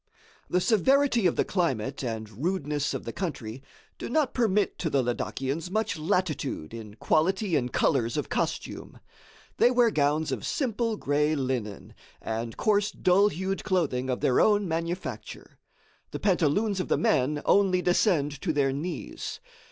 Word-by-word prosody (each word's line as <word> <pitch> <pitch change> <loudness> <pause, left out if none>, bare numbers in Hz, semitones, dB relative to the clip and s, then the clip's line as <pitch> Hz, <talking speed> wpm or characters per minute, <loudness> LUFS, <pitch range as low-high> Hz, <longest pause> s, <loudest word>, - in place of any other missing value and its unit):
The 180 - +2
severity 240 +1 +3
of 170 - 0
the - - +1
climate 135 - -1
and 110 0 -5
rudeness 150 -5 -1
of - - -5
the - - -6
country, 130 - -5 0.4
do - - -5
not 285 +1 +1
permit 210 -4 +1
to 160 - -1
the 140 -3 +2
Ladakians 135 +6 -3
much 215 -1 -1
latitude 155 - -2
in 110 -3 -8
quality 185 - +1
and 125 -4 0
colors 120 -5 +1
of - - -2
costume. - - -3 0.6
They 240 - +5
wear 245 -2 +3
gowns 150 -1 +1
of - - -3
simple 230 -6 -1
gray 150 0 +1
linen 125 -7 -3 0.3
and 115 +1 -4
coarse 205 -1 +2
dull 195 +2 +3
hued 190 0 -3
clothing 155 -10 0
of 125 - -1
their 125 - +3
own 205 -2 +3
manufacture. 170 +2 -5 0.5
The - - -6
pantaloons 190 +3 +1
of 185 - -2
the - - +2
men 150 - +1
only 185 -3 +3
descend 155 -6 +1
to 170 - 0
their 140 -3 +1
knees. 160 +6 -5
165 Hz, 150 wpm, -27 LUFS, 135-200 Hz, 0.6 s, They